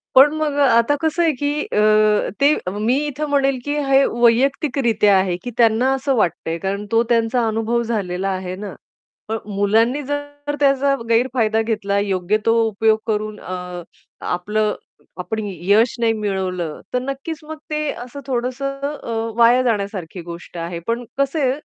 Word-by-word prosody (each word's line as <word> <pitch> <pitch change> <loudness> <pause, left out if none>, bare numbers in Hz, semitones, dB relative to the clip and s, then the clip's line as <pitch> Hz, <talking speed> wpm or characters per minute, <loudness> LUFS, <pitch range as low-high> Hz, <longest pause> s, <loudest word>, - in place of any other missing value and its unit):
पण 275 +3 +8
मग 310 -2 -1
आता 265 0 +4
कसं 320 +2 +1
आहे, 330 - +3
की 290 +3 -1
अ, 215 0 +3
ते 285 +2 +6 0.3
मी 245 +3 +3
इथे 295 +1 -3
म्हणेल, 275 -2 +2
की 290 0 -1
हे 270 0 +5
वैयक्तिकरित्या 240 -3 +2
आहे, 185 -2 0
की 245 - -5
त्यांना 235 +2 +3
असं 270 0 0
वाटतंय, 170 -5 0
कारण 195 +4 -3
तो 230 0 +4
त्यांचा 235 +1 +2
अनुभव 225 +2 0
झालेला 195 -5 -2
आहे 185 -1 -3
ना. 200 0 -7 0.6
पण 225 - -1 0.2
मुलांनी 225 +7 +2
जर 290 +1 -5
त्याचा 275 0 +3
गैरफायदा 230 -2 +2
घेतला, 205 -3 -1
योग्य 195 0 0
तो 225 - +4
उपयोग 220 +1 +2
करून 215 -1 -2
अ, 180 -1 -6 0.5
आपलं 210 +3 -1 0.4
आपण 220 +5 -4
यश 200 +5 +2
नाही 230 -1 +3
मिळवलं, 190 -6 -3
तर 250 - +3
नक्कीच 275 +4 -5
मग 315 +1 -7
ते 305 0 -1
असं 255 +3 -8
थोडंसं 265 +2 -2 0.2
अ, - - -6 0.3
वाया 235 +2 +5
जाण्यासारखी 200 -7 -2
गोष्ट 170 +1 -9
आहे. 170 +1 -4
पण 235 +1 -1
कसं 275 +3 0
आहे 265 -3 +2
230 Hz, 155 wpm, -20 LUFS, 200-270 Hz, 0.6 s, पण